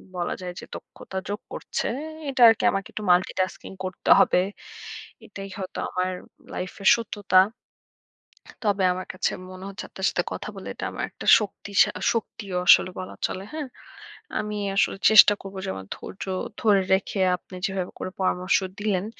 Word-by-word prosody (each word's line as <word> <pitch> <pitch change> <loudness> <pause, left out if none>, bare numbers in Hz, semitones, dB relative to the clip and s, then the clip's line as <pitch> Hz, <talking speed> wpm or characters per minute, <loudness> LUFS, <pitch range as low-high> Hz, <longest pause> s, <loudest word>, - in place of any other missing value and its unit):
বলা 175 -1 -2
যায় 180 -1 -5
যে - - -9
দক্ষতা 190 - -9
যোগ 205 +1 -3
করছে। - - -3 0.4
এটা 265 -2 -2
আরকি 225 - +2
আমাকে 195 - -3
একটু 215 - -5
multitasking 185 +1 0
করতে 185 0 -5
হবে। - - +4 0.9
এটাই 195 -1 -8
হয়তো 190 -2 -6
আমার 185 0 -1 0.4
লাইফের 185 +1 0
সত্যতা। 205 -5 +2 1.2
তবে 200 -2 +1
আমার 185 +1 -5
কাছে 185 - 0 0.2
মনে 185 0 -10
হচ্ছে 200 - -7
আপনার 190 - -4
সাথে - - -1
কথা - - -5
বলে - - -9
এটা - - -6
আমার - - -5
একটা - - -10
শক্তিশা 200 -1 +1 0.2
শক্তিও 205 -4 -4
আসলে - - +7
বলা 185 - -7
চলে। 190 - -6
হ্যাঁ? 310 -3 -4 0.7
আমি 210 0 -3 0.2
আসলে 200 0 +2
চেষ্টা 215 -1 +9
করবো 195 0 -9
যে - - -3
আমার 95 0 -8
ধৈর্য - - -8 0.4
ধরে 205 -3 +4
রেখে, 190 +1 0 0.2
আপনি 185 - -14
যেভাবে 190 -2 -3
করে 185 - -4
পরামর্শ 185 0 +2 0.2
দিলেন, 205 -3 0
195 Hz, 155 wpm, -25 LUFS, 185-205 Hz, 1.2 s, চেষ্টা